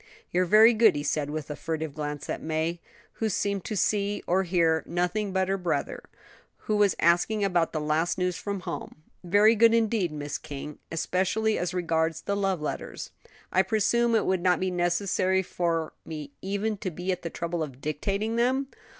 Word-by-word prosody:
"You're 180 +1 +2
very 215 +6 +7
good," 225 0 +5
he 145 - -2
said, 145 -1 -1
with 155 0 -4
a - - -4
furtive 160 -2 -4
glance 150 -1 -5
at - - -3
May, 160 +2 -1 0.4
who 220 - +2
seemed 200 -1 -1
to 215 - -3
see 205 +1 0
or 185 +2 +2
hear 165 -3 +2
nothing 180 +4 -1
but 190 0 +1
her 195 0 0
brother, 180 -1 -2 0.6
who 215 - +1
was 205 -2 +3
asking 175 +6 +2
about 175 -4 +1
the 155 - -2
last 155 +4 0
news 180 -1 0
from 200 -2 -4
home; 170 -3 -7 0.2
"very 205 +5 +5
good 230 +1 +5
indeed, 220 -6 +1
Miss 145 -1 -4
King; 145 +1 -8
especially 190 +6 0
as 175 0 -1
regards 165 -2 0
the 200 - -2
love 195 -4 0
letters. - - -5 0.4
I 185 - +4
presume 225 +4 +2
it 215 - +2
would 185 -1 +1
not 180 -2 +3
be 185 0 -1
necessary 185 +1 +1
for 165 -3 -1
me 150 -3 -7
even 200 +2 -2
to 195 -1 -3
be 180 +2 -3
at 180 - -3
the 170 - -4
trouble 170 0 -3
of 135 -5 -5
dictating 195 +10 -2
them?" 260 +3 +1
180 Hz, 185 wpm, -27 LUFS, 160-205 Hz, 0.6 s, very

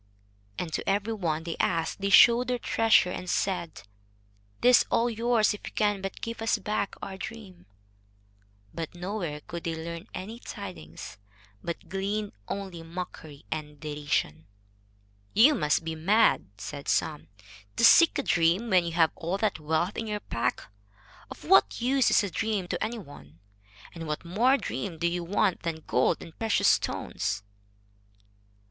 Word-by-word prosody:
And 165 -3 -4
to - - -2
every 205 +3 0
one 165 -6 -2
they 165 -1 -4
asked 165 +2 0
they 200 - 0
showed 235 +5 +7
their 250 0 0
treasure 225 -5 +3
and 180 - -5
said: 175 -5 -2 0.8
"This 250 0 +7
is - - +1
all 235 +1 +2
yours 230 -1 +2
if 210 - -9
you - - -7
can 205 -2 +1
but 195 0 -6
give 230 0 -5
us 225 - +2
back 210 -2 -2
our 190 -1 -6
dream." 190 -4 -9 1.1
But 165 0 -6
nowhere 175 -5 -4
could 170 +3 -7
they 165 -1 -2
learn 170 +4 -7
any 215 +6 -7
tidings, 180 - -9 0.4
but 170 - -5
gleaned 200 +2 -2 0.2
only 190 -4 -5
mockery 165 -3 -8
and 150 -2 -5
derision. 145 - -2 0.9
"You 260 +8 +7
must 150 - +1
be 160 - -2
mad," 195 - +3
said 140 +8 -7
some, 155 -2 0 0.5
"to 235 - +4
seek 335 +7 +7
a 280 - -1
dream 175 +6 +2
when 185 -2 +5
you 170 - -3
have 165 -1 +4
all 175 +3 -2
that 205 -4 0
wealth 160 +5 -1
in 225 - -4
your 210 -1 -2
pack. 115 - -2 0.7
Of - - -11
what 100 - +4
use 260 +1 +3
is - - +4
a 200 - -3
dream 210 -3 -1
to - - -2
any 230 +2 -3
one? 85 - -13 0.5
And 165 -2 -7
what 150 +3 -4
more 235 +10 +3
dream 195 -10 -4
do 170 - -2
you 175 0 0
want 190 +1 +1
than 165 -2 -4
gold 125 - +1
and 165 - -13
precious 225 -1 +2
stones?" 100 +2 -1
185 Hz, 165 wpm, -28 LUFS, 160-215 Hz, 1.1 s, showed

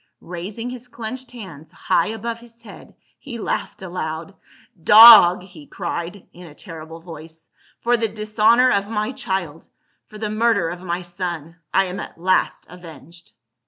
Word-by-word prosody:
Raising 200 +8 -6
his 250 -1 -10
clenched 250 +2 -7
hands 170 -10 -11
high 170 -1 0
above 225 +2 -5
his 235 -1 -18
head 210 - -14 0.2
he 255 -5 -8
laughed 210 - -4
aloud. 170 0 -5 0.3
" 170 - -30
Dog!" 185 -6 +10
he 180 -6 -14
cried 175 +1 -6
in 180 0 -12
a 150 - -15
terrible 160 -1 -10
voice, 160 -1 -12 0.2
" - - -33
for 240 +1 +3
the 225 -1 0
dishonor 220 +4 +3
of 200 +1 0
my 215 +1 -2
child, 190 - -4 0.4
for 215 - -12
the 215 0 -3
murder 215 -6 +1
of 175 +1 -7
my 180 0 -4
106 175 0 -18
PA - - -2
UL. 180 - +1
son, 165 +2 -18 0.2
I 195 - +3
am 185 +1 -6
at - - -8
last 185 +2 0
avenged." 170 -1 -13
185 Hz, 175 wpm, -21 LUFS, 170-225 Hz, 0.4 s, Dog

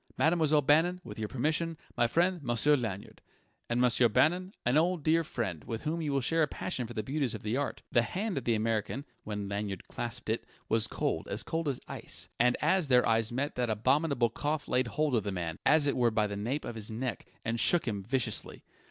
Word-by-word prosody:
Mademoiselle 155 -2 +3
Bannon 165 +6 +3
with - - -8
your 110 - -2
permission 155 +7 -1 0.2
my 120 - +3
friend, 175 +6 +1
Monsieur 130 +3 +3
Lanyard. 110 -7 -5 0.5
And 120 +1 +1
Monsieur 125 -1 +4
Bannon 180 - +2
an 120 +3 +2
old, 170 +1 +2
dear 165 +2 +3
friend, 110 - -4
with 115 -1 -5
whom 165 +2 -1
you 150 -2 -1
will 140 -1 +1
share 165 +6 +1
a 155 - +3
passion 130 -5 -4
for 120 - -9
the 110 - -2
beauties 135 -1 -1
of 110 - -9
art." 140 0 -2
The 120 - +5
hand 190 - -2
of - - -12
the 115 - +2
American, 110 +5 -1 0.2
when 105 -2 -4
Lanyard 100 -2 -4
clasped 120 -2 -5
it, 110 +1 -1 0.2
was 110 0 +2
cold, - - -2
as - - -2
cold 165 -1 -2
as 135 -3 -1
ice; - - -4
and 125 +1 +4
as 175 +1 +3
their 125 -2 +4
eyes 115 0 +2
met 140 +4 -2
that 120 -1 0
abominable 120 +2 +2
cough 150 +4 -2
laid 125 0 +1
hold 150 +2 0
of 115 - +2
the 100 - -3
man, 85 -3 -4
as 155 -1 +5
it 140 - +1
were 120 -2 +3
by 110 -1 +1
the 100 -1 -4
nape 120 +9 -2
of - - -4
his 110 -2 -5
neck, 120 +2 -4 0.2
and 115 +1 -1
shook 175 +1 +4
him 105 -3 -2
viciously. 125 +3 0
125 Hz, 220 wpm, -30 LUFS, 110-155 Hz, 0.5 s, The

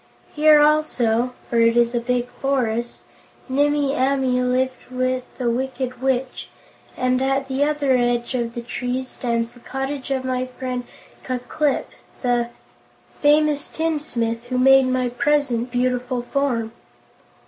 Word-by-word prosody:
Here, 305 0 +6
also 255 -6 +2
for 235 - +1
it 230 +1 +4
is 235 0 +3
a 240 - +1
big 245 0 -1
forest 240 -4 -1 0.5
Nimmie 285 +1 +1
Amee 260 -1 +1
lived 255 +1 -1
with 255 0 -1
the 250 - -2
Wicked 255 +1 -2
Witch, 265 -1 -1 0.5
and 255 0 +1
at 270 0 0
the 265 +1 0
other 295 -2 +1
edge 240 0 0
of 235 -2 -2
the 235 - -4
trees 250 +2 -3
stands 235 -1 -2
the 245 - -17
cottage 270 +2 -4
of 265 -1 -1
my 255 0 -1
friend 255 -1 -5 0.4
Ku 255 -1 -2
Klip, 280 +3 -1 0.4
the 240 -1 +1 0.7
famous 295 0 +3
tinsmith 245 -8 -2
who 250 +1 -2
made 270 +1 +6
my 255 -1 +1
present 255 -2 +1
beautiful 250 0 -1
form." 245 -4 -1
255 Hz, 135 wpm, -22 LUFS, 245-270 Hz, 0.7 s, Here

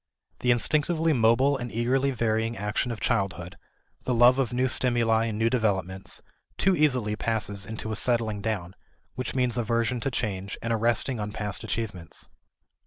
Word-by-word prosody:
The 125 - -1
instinctively 155 +6 +3
mobile 125 +3 +3
and 120 -2 -6
eagerly 130 +4 +1
varying 115 -2 -1
action 105 +4 -1
of 115 - -5
childhood, 90 -1 -1 0.5
the 125 - 0
love 120 +3 +6
of 125 -3 0
new 125 +1 +1
stimuli 120 -3 +2
and 110 -2 -3
new 110 +1 +2
developments, 95 -5 -1 0.3
too 190 0 +3
easily 125 -9 +2
passes 105 -3 -2
into 110 0 -5
a - - -1
"settling 110 -2 +1
down," 100 -5 -3 0.4
which 125 0 -4
means 125 -2 +1
aversion 115 +1 0
to 135 - -1
change 100 -6 -3
and 115 0 0
a - - +3
resting 120 +2 +2
on 105 0 -3
past 105 -1 -3
achievements. 100 -7 -4
115 Hz, 165 wpm, -26 LUFS, 105-125 Hz, 0.5 s, love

